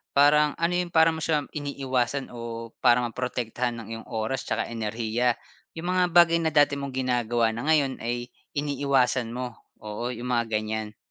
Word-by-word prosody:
parang 150 +1 +5
ano 170 +1 0
yung 175 -1 -3
para 160 0 +6
mo 160 - -5
siya 150 -2 +1
iniwasan 135 -2 -1
o 115 -1 -6
para 125 -1 +6
ma 120 - -2
protektahan 125 -1 -2
ang 115 - -9
iyong 115 0 -7
oras 115 +4 -3
tsaka - - -1
enerhiya, 115 +2 0 0.4
yung 170 +2 -3
mga 185 0 +3
bagay 170 -1 +7
na 160 -1 0
dati 145 -1 +4
mong 140 -2 -5
ginagawa 120 -3 +1
na 115 +6 -5
ngayon 145 -4 +2
ay 120 +1 -3 0.2
iniwasan 140 -4 +1
mo. 125 0 -3 0.3
Oo, 105 +3 -4
yung 125 +2 -4
mga 120 -1 +1
ganyan. 110 0 -4
125 Hz, 175 wpm, -26 LUFS, 115-145 Hz, 0.4 s, bagay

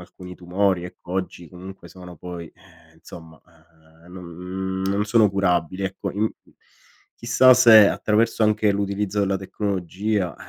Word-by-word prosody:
alcuni 90 0 -12
tumori 90 +1 -1
ecco 90 0 -11
oggi 90 -3 -5
comunque 95 +2 -12
sono 90 -1 -13
poi, 85 0 -9
ehm, 85 -3 -24
insomma, 80 -1 -14 0.7
ehm, 90 - -15
non 95 +2 -6
non 100 +2 -1
sono 110 -1 +3
curabili. 95 -1 -1
Ecco 95 0 -5
in 105 +2 -1 0.9
chissà 125 +2 +4
se 110 -5 +7
attraverso 110 +1 0
anche 105 -1 +2
l'utilizzo 100 0 -2
della 95 -1 0
tecnologia, 95 -1 -3
95 Hz, 130 wpm, -22 LUFS, 90-105 Hz, 0.9 s, se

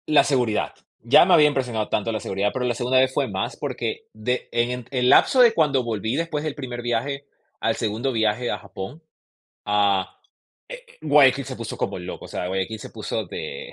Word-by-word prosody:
La 150 -1 +5
seguridad. 125 -6 0 0.3
Ya 140 +8 +6
me 185 - +4
había 150 -3 +7
impresionado 125 -7 -1
tanto 110 +2 -1
la 110 - -2
seguridad, 100 +1 -1
pero 125 -1 -2
la 120 - +1
segunda 125 +2 +1
vez 130 0 +2
fue - - 0
más, - - -3
porque 445 0 -4
de 125 0 -3
en 120 +1 -1
el 125 -2 +2
lapso 255 - +6
de 235 -2 +7
cuando 145 - +2
volví, 110 0 -2
después 160 -1 -2
del 155 -2 -3
primer 125 -4 -6
viaje, 125 +4 -2 0.3
al 115 - 0
segundo 115 +4 -2
viaje 110 +1 0
a - - -2
Japón, 100 +9 -8 0.7
ah, 100 -2 +1 0.5
eh, - - -9
eh, - - -21
Guayaquil 140 -3 +5
se 130 -1 -7
puso 115 -1 -6
como - - -3
loco. 90 0 -7
O - - -15
sea, - - -4
Guayaquil 95 +3 -2
se - - -9
puso - - -4
de 485 +2 -7
125 Hz, 200 wpm, -23 LUFS, 110-145 Hz, 0.7 s, había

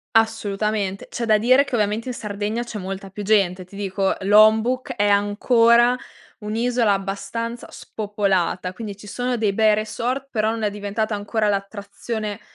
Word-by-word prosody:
Assolutamente, 210 -3 0
c'è 235 - -3
da 215 -1 +4
dire 255 +5 +4
che 275 -2 -11
ovviamente 215 +2 -1
in - - -3
Sardegna 210 +1 -3
c'è 235 -2 -7
molta 195 +1 -6
più 205 +2 -7
gente. 195 -3 +2
Ti 185 +2 -14
dico, 195 -1 0
Lombok 220 +6 +4
è 205 0 +2
ancora 230 +4 +4 0.4
un'isola 230 +1 0
abbastanza 200 +4 -3
spopolata, 195 -4 -2
quindi 205 -1 -7
ci 210 - -13
sono 245 +4 -2
dei 210 -3 +1
bei 215 +1 +4
resort, 240 +5 -2
però 215 -4 0
non 225 -1 -4
è 210 - +2
diventata 205 +1 -3
ancora 210 +1 -1
l'attrazione 205 +1 -4
210 Hz, 155 wpm, -22 LUFS, 200-230 Hz, 0.4 s, da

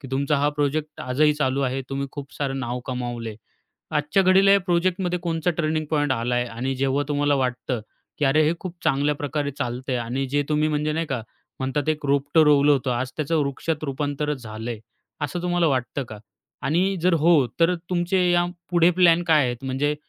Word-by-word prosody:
की 135 - -9
तुमचा 140 +2 +1
हा 145 +1 +2
प्रोजेक्ट 150 +1 -1
आजही 150 +4 +2
चालू 140 -2 0
आहे. 130 +1 -1
तुम्ही 140 0 -2
खूप 140 -1 -8
सारं 135 -2 -2
नाव 125 -1 -3
कमावलंय. 120 -3 -4 0.5
आजच्या 150 +6 +2
घडीला 190 +1 +5
या 200 - +5
प्रोजेक्टमध्ये 180 0 0
कोणचा 165 0 0
ट्रेनिंग 155 -1 -1
पॉइंट 145 -3 +1
आलाय? 120 0 0
आणि 125 +3 -3
जेव्हा 135 +2 +1
तुम्हाला 145 0 +2
वाटतं, 125 -2 -1 0.4
की 150 - +1
अरे 150 +3 +4
हे - - +2
खूप 185 -1 -7
चांगल्या 145 0 +2
प्रकारे 145 0 -2
चालतंय 125 +1 -2
आणि 125 +4 -2
जे 145 +2 +1
तुम्ही 150 0 +2
म्हणजे 150 0 0
नाही 165 +1 -1
का 130 -5 -3 0.4
म्हणतात 135 +3 -1
एक 155 -1 -1
रोपटं 140 +3 +3
रोवलं 145 0 +5
होतं, 135 -1 0
आज 125 +2 -2
त्याचं 155 +2 0
वृक्षात 150 +3 -3
रूपांतरच 145 0 -2
झालंय, 110 +1 -6 0.5
असं 170 +5 -4
तुम्हाला 175 -1 +1
वाटतं 130 +1 -1
का? 110 - -8 0.4
आणि 185 +6 +1
जर 180 0 +4
हो, 160 -4 +4
तर 175 +2 +4 0.2
तुमचे 180 0 +1
या 175 0 +3 0.3
पुढे 175 0 +5
प्लॅन 175 -1 +4
काय 155 -4 +4
आहेत? 120 +1 -4
म्हणजे 135 +3 0
145 Hz, 185 wpm, -24 LUFS, 130-165 Hz, 0.5 s, घडीला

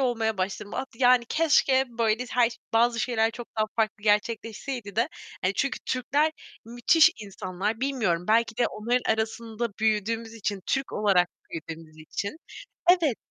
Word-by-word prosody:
olmaya 225 -5 0
başladım, 200 +2 -3
at 265 - -3
yani, 245 0 +4
"Keşke 275 -4 +3
böyle 230 +1 0
s - - -10
her 240 -2 +4 0.2
bazı 235 0 +3
şeyler 225 -2 +1
çok 235 +1 -8
daha 215 - +4
farklı 215 -2 0
gerçekleşseydi." 220 +1 -1
de 235 +5 +2 0.3
hani 185 +2 +1
çünkü 275 -1 -1
Türkler 290 +5 +1 0.3
müthiş 240 +8 +4
insanlar, 200 +2 -4
bilmiyorum, 225 -11 0
belki 225 0 +3
de 245 - +3
onların 235 +2 0
arasında 225 +1 -3
büyüdüğümüz 220 +1 0
için, 205 -3 -3
Türk 270 0 -1
olarak 190 -4 +3 0.2
büyüdüğümüz 160 -1 -8
için 200 - -5 0.7
Evet. 275 -8 +1
225 Hz, 145 wpm, -26 LUFS, 210-245 Hz, 0.7 s, yani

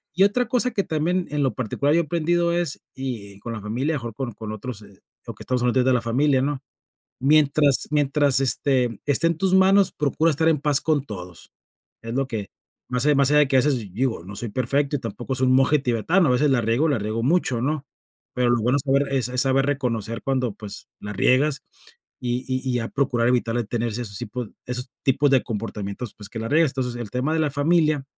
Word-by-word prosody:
Y 190 - +4
otra 240 +5 +2
cosa 250 0 +2
que 200 - -1
también 175 +3 -1
en 150 - -1
lo 130 -4 0
particular 135 +4 0
yo 170 - +4
he - - -5
aprendido 170 +2 0
es 175 -4 -2
y 110 -7 -5
con 115 +3 -6
la 110 - -6
familia, 130 +9 -2
mejor 120 -4 -5
con 125 -3 -4
con 110 0 -7
otros, 110 0 -7 0.4
o - - -6
que - - -11
estamos 125 -1 -1
hablando 125 +1 +2
de 130 - +3
la 125 - +1
familia, 130 +3 +2
¿no?, 140 0 -2 0.6
mientras 145 0 +3
mientras, 145 -2 +3
este, 130 -4 +1
esté 145 +4 +3
en 165 -1 -2
tus 190 +1 +1
manos, 190 +1 +4
procura 150 +3 +1
estar 160 +2 +1
en 155 -3 +3
paz 145 -2 +3
con 150 -4 0
todos. 90 -4 -9 0.5
Es 115 0 -6
lo 135 +1 0
que 110 -5 -5 0.4
más 125 +3 +1
allá 150 - +4
más 140 -1 +4
allá 150 - +5
de 145 - +3
qué 135 - +2
haces, 135 0 +2 0.2
digo, 115 -7 -1
no 100 +2 -9
soy 120 - -3
perfecto 140 +5 0
y - - -7
tampoco 115 +3 -5
soy 130 0 +1
un 130 - +4
monje 135 +3 +4
tibetano, 140 - +1
a 125 - +3
veces 145 +4 +2
la 130 -3 +3
riego, 115 +9 +1
la 140 -6 +1
riego 110 +2 -3
mucho, 135 -4 +1
¿no?, 145 +1 -2 0.5
pero 125 -1 +1
lo 120 -2 +1
bueno 125 +4 +2
saber 140 0 0
es 130 -4 +1
saber 130 +2 +1
reconocer 115 -5 -2
cuando, 130 -4 -1
pues, 105 -2 -8
la 105 - -6
riegas 135 +8 +2 0.6
y 125 +1 -2
y 130 0 -1
y 125 - 0
a 115 - -4
procurar 125 -4 0
evitarle 120 -1 +1
de - - -11
tener 120 0 -1
esos 110 -2 -4
tipos 115 +1 -5 0.2
esos 125 +1 -2 0.2
tipos 140 +2 +2
de 135 -2 +4
comportamientos, 105 0 -5
pues, 105 -2 -8
que 115 - -7
la 115 - -4
riegues. 155 -1 +3
Entonces, 125 -2 -3
el 115 -4 -6
tema 135 +6 -1
de 160 - +1
la 155 -2 +1
familia, 150 0 +1
130 Hz, 220 wpm, -23 LUFS, 120-150 Hz, 0.6 s, allá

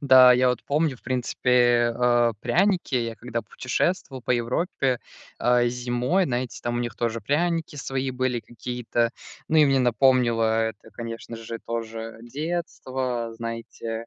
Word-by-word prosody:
Да, 130 -2 +8
я 125 +1 +4
вот 125 -2 -1
помню, 145 -2 +1
в - - -27
принципе, 120 -1 +2
э, 120 -1 +3
пряники. 175 +1 +1
Я, 115 -1 -1
когда 120 0 -4
путешествовал 130 - -2
по 125 - 0
Европе, 125 +1 0 0.4
э, 120 0 +3
зимой, 125 +9 0
знаете, 125 -2 -3
там 120 0 -2
у 120 - 0
них 120 -3 -4
тоже 115 -1 -1
пряники 165 +6 0
свои 135 -1 -2
были 125 -1 -1
какие-то. 120 0 -2 0.4
Ну 160 - +3
и 150 - +8
мне 135 -1 +3
напомнило 125 -1 +3 0.2
это, 110 0 -6
конечно 115 0 -7
же, 115 0 -7
тоже 115 -1 -5
детство, 130 -5 -3
знаете, 115 0 -5
125 Hz, 145 wpm, -25 LUFS, 115-130 Hz, 0.4 s, Да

